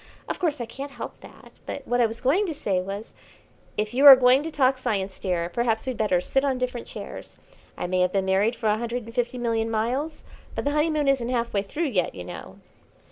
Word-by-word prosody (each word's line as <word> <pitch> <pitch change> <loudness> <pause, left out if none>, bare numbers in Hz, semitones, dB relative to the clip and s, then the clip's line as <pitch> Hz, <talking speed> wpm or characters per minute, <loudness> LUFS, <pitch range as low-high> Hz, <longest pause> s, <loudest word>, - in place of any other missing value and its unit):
Of - - -4
course 315 -6 0
I 240 - -3
can't 270 +5 -7
help 240 - -7
that, - - -16
but - - -6
what 245 0 +2
I 235 - +5
was 225 +1 -8
going 345 +11 +2
to 325 - -3
say 190 -9 0
was 200 +3 -7 0.3
" - - -32
"If 210 +2 -1
you 275 +3 +6
are 275 - +14
going 255 +1 +5
to 320 - -4
talk 265 -4 +2
science, 195 -5 -2
dear, 175 -3 -1
perhaps 225 +4 -1
we'd 260 -1 -2
better 205 -5 +2
sit 270 +9 0
on 270 -2 +1
different 250 -1 -3
chairs. - - -9 0.4
I - - -3
may 185 +1 0
have 180 0 +2
been 195 -1 +1
married 195 +5 +2
for 225 - -8
a 215 0 +2
hundred 235 +1 -3
and 230 +1 -11
fifty 245 0 -1
million 225 -2 0
miles, 250 +8 -2 0.3
but - - -3
the 285 - +2
honeymoon 300 -1 +1
isn't 260 -3 +2
half 235 -2 -1
way 200 - +2
through 295 +11 -2
yet, 185 - 0
you 90 - -6
know." 90 - -9
235 Hz, 240 wpm, -25 LUFS, 210-270 Hz, 0.4 s, are